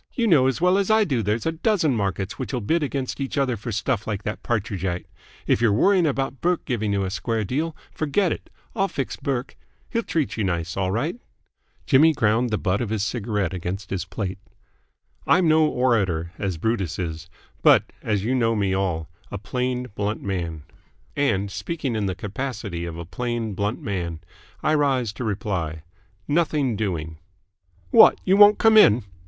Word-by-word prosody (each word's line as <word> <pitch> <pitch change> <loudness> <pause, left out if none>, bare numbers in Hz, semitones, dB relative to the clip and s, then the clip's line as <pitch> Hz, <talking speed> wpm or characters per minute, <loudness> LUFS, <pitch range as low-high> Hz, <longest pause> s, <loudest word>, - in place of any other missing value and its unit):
You 235 - +1
know 150 - +5
as 135 - 0
well 180 +3 +3
as 200 - 0
I 220 0 +5
do 140 -10 0
that - - -5
there's 105 +2 -1
a 165 - +1
dozen 165 - +1
markets 100 -2 -2
which'll 130 -1 -2
bid 160 +11 +1
against 140 -2 -3
each 135 +1 -3
other 135 -3 +1
for 115 +2 -6
stuff 110 +1 -1
like 105 -2 -3
that 105 - -4
Partridgite. 95 -5 -2 0.4
If - - +2
you're 115 -3 +4
worrying 180 - +4
about 135 -2 -2
Burke 175 0 0
giving 110 -5 -1
you 100 -1 0
a 95 - -3
square 110 +3 -1
deal, 155 - -2 0.2
forget 160 +4 0
it. - - -5 0.3
I'll 195 -3 +2
fix 135 -8 -4
Burke. 130 -2 -3 0.4
He'll 230 - +1
treat 160 - -2
you 110 - 0
nice, 85 -2 -2
all 95 -1 0
right." 140 - -1 0.7
Jimmy 155 +3 +5
ground 115 -1 +2
the 110 - 0
butt 100 +2 0
of 120 - -2
his 110 -2 -1
cigarette 105 -4 -2
against 90 +2 -5
his 90 -4 -2
plate. 95 -1 -4 0.9
"I'm 180 -2 +4
no 155 0 +5
orator, 100 - +1
as 95 -4 -2
Brutus 95 -3 -1
is; 80 -2 -5 0.3
but, - - +6 0.2
as 105 -3 -1
you 120 +4 0
know 115 -3 +2
me 100 -3 0
all, 90 -4 -1 0.2
a - - -5
plain, 125 +4 -2
blunt 105 +1 -3
man. 85 -6 -3 0.5
And, 100 -9 0
speaking 145 - -3
in 105 -2 -1
the 95 - -2
capacity 100 -3 -4
of 85 -1 -6
a 85 - -6
plain, 120 +3 -3
blunt 105 +4 -2
man, 85 -6 -3 0.4
I 155 - +2
rise 135 -7 +1
to 125 - -6
reply 95 -7 -3 0.4
Nothing 150 -6 +1
doing." 80 -7 -3 0.7
"What? - - +7
You 190 - +4
won't 205 +1 +8
come 225 -1 +5
in?" 115 - +7
110 Hz, 185 wpm, -23 LUFS, 95-140 Hz, 0.9 s, won't